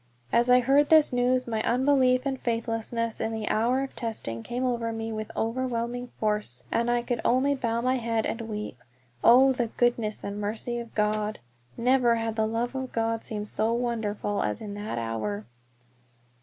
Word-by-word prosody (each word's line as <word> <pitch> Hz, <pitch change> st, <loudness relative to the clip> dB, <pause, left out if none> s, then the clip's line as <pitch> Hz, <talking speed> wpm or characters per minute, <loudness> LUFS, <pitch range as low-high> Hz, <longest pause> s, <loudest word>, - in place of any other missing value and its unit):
As 240 Hz, +1 st, +3 dB
I 250 Hz, 0 st, +7 dB
heard 275 Hz, +4 st, +4 dB
this 310 Hz, -4 st, +6 dB
news 250 Hz, +1 st, +2 dB
my 220 Hz, -2 st, -1 dB
unbelief 255 Hz, 0 st, +3 dB
and 270 Hz, -1 st, -1 dB
faithlessness 230 Hz, -1 st, -2 dB
in 225 Hz, -, -1 dB
the 220 Hz, -1 st, -4 dB
hour 245 Hz, +5 st, +2 dB
of 270 Hz, -, -7 dB
testing 215 Hz, -, -4 dB
came 245 Hz, -, -3 dB
over 235 Hz, -2 st, -1 dB
me 225 Hz, 0 st, -4 dB
with 215 Hz, -1 st, -4 dB
overwhelming 245 Hz, +1 st, -2 dB
force, 210 Hz, -, -1 dB
and 235 Hz, +1 st, +1 dB
I 240 Hz, 0 st, +1 dB
could 240 Hz, -1 st, -2 dB
only 260 Hz, +3 st, +3 dB
bow 235 Hz, -4 st, -1 dB
my 255 Hz, +2 st, +1 dB
head 230 Hz, -2 st, -1 dB
and 230 Hz, -, -3 dB
weep. 210 Hz, -, -5 dB, 0.4 s
Oh, 265 Hz, +3 st, +7 dB
the 245 Hz, -2 st, -1 dB
goodness 230 Hz, -2 st, 0 dB
and 200 Hz, +1 st, -4 dB
mercy 225 Hz, +3 st, -3 dB
of 235 Hz, -1 st, -9 dB
God! 210 Hz, 0 st, 0 dB, 0.4 s
Never 245 Hz, -1 st, +3 dB
had 225 Hz, -1 st, -2 dB
the 220 Hz, -1 st, +1 dB
love 235 Hz, +3 st, -2 dB
of 260 Hz, -1 st, -4 dB
God 225 Hz, 0 st, -1 dB
seemed 210 Hz, -1 st, -5 dB
so 220 Hz, +2 st, +1 dB
wonderful 220 Hz, -4 st, -1 dB
as 105 Hz, -, -1 dB
in 205 Hz, -2 st, -6 dB
that 205 Hz, -, -5 dB
hour. 110 Hz, -3 st, -3 dB
230 Hz, 180 wpm, -27 LUFS, 215-250 Hz, 0.4 s, I